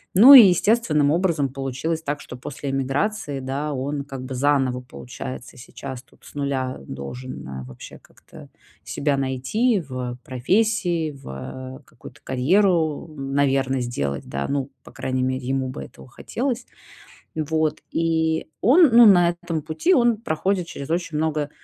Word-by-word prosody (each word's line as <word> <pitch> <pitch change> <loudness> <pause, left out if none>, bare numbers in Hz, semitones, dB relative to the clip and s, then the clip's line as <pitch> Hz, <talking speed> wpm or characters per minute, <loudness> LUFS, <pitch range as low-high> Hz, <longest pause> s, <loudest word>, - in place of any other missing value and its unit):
Ну 240 +9 +10
и 245 -7 +11
естественным 175 -6 +2
образом 165 -4 +1
получилось 135 +5 -3
так, 145 -2 -3
что 125 - -9
после 135 +2 -6
эмиграции, 140 +3 -1
да, 140 +3 -3
он 140 +2 -3
как 135 -2 -8
бы 130 - -6
заново, 130 -2 +1
получается, 65 - -9
сейчас 130 -3 -8
тут 120 - -25
с - - -14
0, 135 -2 -2
э, - - -14
должен, 70 - -7
э, 65 -1 -7
вообще 65 0 -11
как-то - - -16 0.3
себя 145 0 -1
найти 135 - 0
в 130 -5 -5
профессии, 175 - 0
в, 140 - -12 0.5
э, - - -29
какую-то - - -14
карьеру, 160 +3 +1
м, 135 -1 -5
наверно, 135 -1 +1
сделать, 70 - -3
да, 70 0 -4
ну, 140 -1 -2
по - - -14
крайней 130 0 -2
мере, 130 0 -2
ему 135 0 -1
бы 130 - -6
этого - - -14
хотелось. 245 - -3 0.7
Вот, 155 0 0
и 160 -1 0
он, 295 - +6
ну, 235 0 +9
на 175 -5 +6
этом 170 -2 -4
пути 160 - +1
он 240 -5 +3
проходит 185 -2 -1
через 145 -4 -8
очень 170 -2 -2
много 155 -2 -1
145 Hz, 155 wpm, -23 LUFS, 130-170 Hz, 0.7 s, и